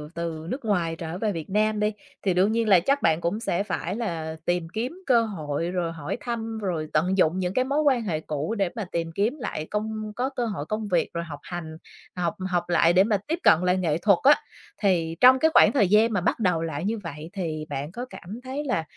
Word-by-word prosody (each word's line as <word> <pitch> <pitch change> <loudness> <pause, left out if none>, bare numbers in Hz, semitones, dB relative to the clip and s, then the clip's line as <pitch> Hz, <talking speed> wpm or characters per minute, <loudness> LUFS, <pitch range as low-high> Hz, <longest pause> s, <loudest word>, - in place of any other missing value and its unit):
từ 165 -2 -4
nước 260 -2 -4
ngoài 175 -6 0
trở 165 +1 -5
về 215 0 0
Việt 165 -2 -6
Nam 215 +1 +1
đi, 210 0 +1 0.3
thì 190 - +2
đương 185 +4 +3
nhiên 225 0 +1
là 190 -3 +7
chắc 275 +11 +1
bạn 160 +1 +2
cũng 175 +6 -1
sẽ 200 -4 -1
phải 190 -2 -3
là 165 -8 -3
tìm 175 -1 0
kiếm 255 +12 -4
cơ 240 -4 +4
hội 165 -6 -3
rồi 175 -2 -1
hỏi 160 +5 -5
thăm, 225 -2 -4
rồi 170 -7 -2
tận 180 +5 +2
dụng 180 +1 +3
những 180 0 -1
cái 255 +4 +1
mối 285 +3 +1
quan 270 -5 +3
hệ 170 -7 -1
cũ 155 +7 -3
để 195 -3 +1
mà 220 -4 -3
tìm 165 -1 -2
kiếm 215 - 0
lại 155 -11 -4
công 215 0 -3
có 255 +2 -1
cơ 260 -3 -2
hội 200 -10 -4
công 215 +5 -3
việc 175 -4 +1
rồi 170 - -2
học 150 -4 -8
hành, 160 -3 -6 0.4
học 175 -2 -1
học 175 -1 -1
lại 170 0 +4
để 185 - +6
mà 210 -1 +1
tiếp 330 +3 -1
cận 160 - +6
lại 180 +1 +2
nghệ 165 -5 0
thuật 195 +1 +4
á. 290 +2 +8 0.5
Thì 170 -5 +1
trong 255 +1 +8
cái 320 +4 +3
khoảng - - +7
thời 210 -10 +3
gian 220 +3 +4
mà 200 - +1
bắt - - 0
đầu 180 -6 +1
lại 160 0 -3
như 225 +3 0
vậy 160 -5 -8
thì 160 -6 -3
bạn 140 +3 -4
có 245 +6 -5
cảm 205 -1 -9
thấy 265 +3 -4
là 245 - -1
190 Hz, 245 wpm, -25 LUFS, 165-225 Hz, 0.5 s, á